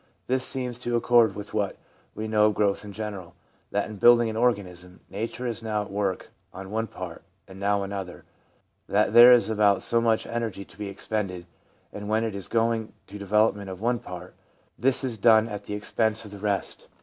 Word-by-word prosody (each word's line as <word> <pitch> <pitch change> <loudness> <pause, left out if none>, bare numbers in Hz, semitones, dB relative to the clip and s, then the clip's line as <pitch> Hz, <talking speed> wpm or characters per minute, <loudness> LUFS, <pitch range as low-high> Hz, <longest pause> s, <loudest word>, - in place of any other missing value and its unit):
This 130 0 0
seems 125 -2 -2
to 120 -1 -2
accord 120 -3 +4
with 105 0 -8
what 105 -2 -1 0.4
we 110 +1 -4
know 105 -1 +4
of 105 - 0
growth 100 -1 +1
in 105 - -8
general, 100 -4 -7 0.3
that 100 0 -1
in 110 -1 -9
building 120 +1 +5
an - - -7
organism 90 -6 -1
Nature 115 +5 -4
is 115 -1 -3
now 105 -2 -1
at 100 - -11
work 100 -2 -2 0.2
on 95 +1 -9
one 110 +1 -1
part - - -8 0.3
and 95 0 -12
now 100 0 +1
on 100 - -6
another; 95 -3 -6 0.6
that 105 +1 +2
there 120 +1 +10
is 120 -1 +5
about 105 -2 +2
so 115 0 +2
much 115 -1 +1
energy 115 -4 -4
to - - -17
be 105 -1 -4
expended, 95 -3 -4 0.5
and 105 0 -6
when 110 +1 +1
it 110 -2 -2
is 100 -2 -6
going 115 -1 0
to - - -19
the 105 - -7
development 105 0 +1
of 95 -1 -7
one 120 +2 0
part, 90 -7 -9 0.4
this 130 +3 +1
is 120 -5 -3
done 110 +1 +5
at 105 -2 -7
the 105 - -4
expense 110 +1 -1
of 105 - -11
the 100 - -9
rest. 100 -1 -3
105 Hz, 210 wpm, -26 LUFS, 100-115 Hz, 0.6 s, there